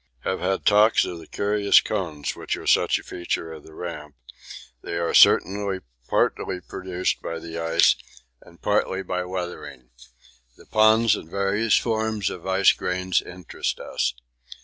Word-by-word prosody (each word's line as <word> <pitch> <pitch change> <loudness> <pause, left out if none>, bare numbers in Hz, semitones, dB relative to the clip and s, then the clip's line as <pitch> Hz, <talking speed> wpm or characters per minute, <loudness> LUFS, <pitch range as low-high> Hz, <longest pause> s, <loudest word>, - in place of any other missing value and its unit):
Have 95 - -2
had 95 +1 -1
talks 105 +2 +5
of 85 - -6
the 80 - -13
curious 100 0 +3
cones 80 -9 -3
which - - -4
are - - -10
such - - +3
a - - -10
feature 85 -2 -4
of 80 - -10
the 80 - -16
Ramp 75 -5 -7 0.7
they 85 - -5
are 85 0 -1
certainly 100 -1 +4 0.3
partly 90 - 0
produced 90 +1 -3
by 85 - -5
ice 80 0 +2 0.5
and 85 - -18
partly 95 -2 0
by 90 0 -2
weathering. 90 -8 -7 0.7
The - - -17
ponds 110 0 +4
and 80 - -9
various 100 +4 +1
forms 110 -3 -1
of 90 0 -8
ice 95 +1 +5
grains 90 0 -1
interest 90 -2 -5
us. - - -2
90 Hz, 150 wpm, -24 LUFS, 85-100 Hz, 0.7 s, talks